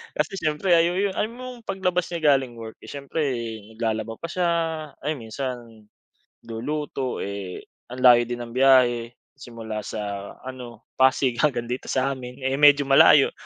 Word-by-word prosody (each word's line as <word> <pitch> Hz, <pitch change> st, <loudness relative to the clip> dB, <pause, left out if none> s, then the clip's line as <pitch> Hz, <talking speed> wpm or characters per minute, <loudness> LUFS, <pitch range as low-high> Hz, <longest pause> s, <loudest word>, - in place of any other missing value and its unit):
Kasi, 150 Hz, +4 st, -1 dB
siyempre, 155 Hz, +5 st, -1 dB
ay 165 Hz, 0 st, +4 dB
’yu 175 Hz, -, -2 dB
yu -, -, -3 dB
’ay -, -, 0 dB
mong 245 Hz, +1 st, -10 dB
paglabas 180 Hz, -2 st, -1 dB
niya 155 Hz, -4 st, +3 dB
galing 130 Hz, -3 st, -3 dB
work, 115 Hz, -1 st, -9 dB
eh -, -, -11 dB
siyempre 140 Hz, +2 st, -6 dB, 0.6 s
naglalaba 110 Hz, 0 st, -2 dB
pa 165 Hz, -, -5 dB
siya, 180 Hz, -1 st, 0 dB, 0.6 s
ayun, 150 Hz, -1 st, -2 dB
minsan 130 Hz, +3 st, -3 dB, 0.9 s
luluto. 130 Hz, +3 st, -4 dB
Eh, 100 Hz, -2 st, -6 dB, 0.3 s
ang 125 Hz, -, -7 dB
layo 120 Hz, -1 st, +7 dB
din 120 Hz, +1 st, -5 dB
ng 120 Hz, -1 st, -8 dB
biyahe 125 Hz, -3 st, +4 dB, 0.3 s
simula 115 Hz, -4 st, -7 dB
sa 100 Hz, -2 st, -5 dB
ano, 125 Hz, -3 st, -9 dB, 0.2 s
Pasig 130 Hz, -2 st, +3 dB
hanggang 130 Hz, -6 st, +1 dB
dito 125 Hz, +2 st, -5 dB
sa 135 Hz, +1 st, 0 dB
amin. 130 Hz, 0 st, -8 dB
Eh, 135 Hz, +2 st, -1 dB
medyo 145 Hz, -1 st, +6 dB
malayo, 135 Hz, +1 st, +6 dB
130 Hz, 160 wpm, -24 LUFS, 120-150 Hz, 0.9 s, layo